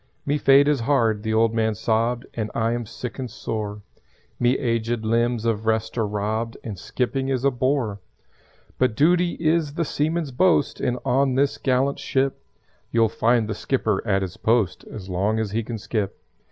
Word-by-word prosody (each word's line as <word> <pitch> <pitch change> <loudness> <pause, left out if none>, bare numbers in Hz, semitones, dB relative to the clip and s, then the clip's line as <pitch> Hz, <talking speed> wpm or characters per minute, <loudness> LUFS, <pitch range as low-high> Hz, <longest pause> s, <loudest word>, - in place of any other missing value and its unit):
"Me 145 +1 0
fate 140 +1 +6
is 150 -3 +2
hard," 115 -4 +2
the 110 0 -2
old 110 0 +3
man 110 -1 +1
sobbed, 115 +3 0
"And 110 -2 -3
I 115 0 +1
am 120 -2 -3
sick 120 +3 -7
and 130 -2 -4
sore. 105 -2 -5 0.6
Me 120 +2 +3
aged 115 -2 -1
limbs 115 +1 +1
of 110 -1 -1
rest 110 0 0
are 115 -3 0
robbed 110 +3 -2
And 105 -5 -6
skipping 130 +4 -2
is 130 -1 0
a 140 - +4
bore. 125 -5 0 0.8
"But 125 -4 +2
Duty 175 +5 +3
is 155 -2 0
the 170 - 0
seaman's 155 0 -1
boast, 165 +1 +2
And 125 -1 0
on 135 0 +2
this 140 +1 +1
gallant 135 +1 +1
ship 135 0 -1 0.5
You'll 115 -1 +3
find 115 0 +2
the 110 - -2
skipper 110 -1 0
at 95 -1 +2
his 95 -1 -6
post 110 -4 +1
As 95 -4 -9
long 100 +4 0
as 110 -2 -2
he 115 +2 0
can 115 +1 -5
skip." 105 -2 -3
115 Hz, 180 wpm, -23 LUFS, 110-135 Hz, 0.8 s, fate